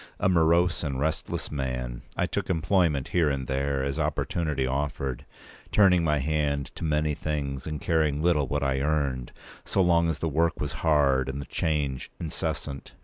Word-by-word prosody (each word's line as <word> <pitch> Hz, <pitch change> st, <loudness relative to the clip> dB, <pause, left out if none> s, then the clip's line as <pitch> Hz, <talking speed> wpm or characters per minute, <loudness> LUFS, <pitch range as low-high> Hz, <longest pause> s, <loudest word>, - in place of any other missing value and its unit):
A -, -, +2 dB
morose 85 Hz, 0 st, +3 dB
and 70 Hz, -4 st, -2 dB
restless 80 Hz, +2 st, -2 dB
man, 65 Hz, -4 st, -3 dB, 0.2 s
I -, -, +2 dB
took -, -, -3 dB
employment 85 Hz, -5 st, +1 dB
here 85 Hz, -4 st, +3 dB
and 70 Hz, -2 st, -2 dB
there, 70 Hz, +1 st, -1 dB
as 70 Hz, +3 st, -2 dB
opportunity 75 Hz, -1 st, -1 dB
offered, 70 Hz, -1 st, -2 dB, 0.4 s
turning 90 Hz, -4 st, +5 dB
my 75 Hz, -2 st, +2 dB
hand 70 Hz, -1 st, -1 dB
to -, -, -7 dB
many 75 Hz, -1 st, +1 dB
things, 70 Hz, -3 st, -3 dB
and 75 Hz, -1 st, -3 dB
caring 80 Hz, -4 st, +1 dB
little 75 Hz, -4 st, +2 dB
what 70 Hz, +2 st, -1 dB
I 65 Hz, -1 st, +1 dB
earned, 70 Hz, -4 st, 0 dB, 0.3 s
so -, -, -1 dB
long 85 Hz, -1 st, +3 dB
as 80 Hz, -, -1 dB
the 80 Hz, -, -2 dB
work 80 Hz, +2 st, +1 dB
was 75 Hz, -1 st, -2 dB
hard 70 Hz, -4 st, +3 dB
and 65 Hz, +1 st, -4 dB
the 70 Hz, -, -5 dB
change 75 Hz, -5 st, -1 dB
incessant. 75 Hz, -3 st, -4 dB
75 Hz, 170 wpm, -27 LUFS, 70-80 Hz, 0.4 s, turning